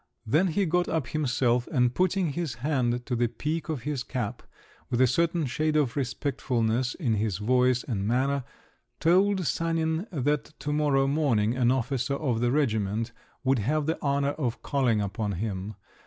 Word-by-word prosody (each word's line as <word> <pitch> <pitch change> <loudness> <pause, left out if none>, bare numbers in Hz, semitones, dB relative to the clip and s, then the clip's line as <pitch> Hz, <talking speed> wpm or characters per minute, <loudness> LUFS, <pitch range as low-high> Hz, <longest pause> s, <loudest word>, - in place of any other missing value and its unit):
Then 155 - +3
he 195 +4 +1
got 175 +1 +1
up 155 -7 -1
himself, 125 -5 +1
and 125 -5 +2
putting 185 -1 +1
his 165 -4 -3
hand 125 -3 0
to 125 - -1
the 120 0 +2
peak 150 +8 -3
of 145 -7 -3
his 145 -2 -2
cap, 125 -4 -4 0.5
with 120 - 0
a 130 - +7
certain 165 +5 +1
shade 155 +4 0
of 140 -6 +2
respectfulness 125 -3 -1
in 130 -10 0
his 105 -3 0
voice 125 +3 +2
and 105 -6 -2
manner, 135 +3 +1 0.6
told 185 +3 +3
Sanin 165 - 0
that 150 -1 -1
to 150 - -2
morrow 145 -2 +2
morning 130 -7 +1
an 125 -2 +2
officer 130 +1 0
of 130 -6 -1
the 120 0 +1
regiment 115 -5 0 0.3
would 135 -1 +2
have 150 +8 0
the 160 +2 -2
honour 140 0 +1
of 130 -6 -3
calling 125 -6 +1
upon 100 +1 -2
him. 100 +1 -4
130 Hz, 170 wpm, -27 LUFS, 120-155 Hz, 0.6 s, a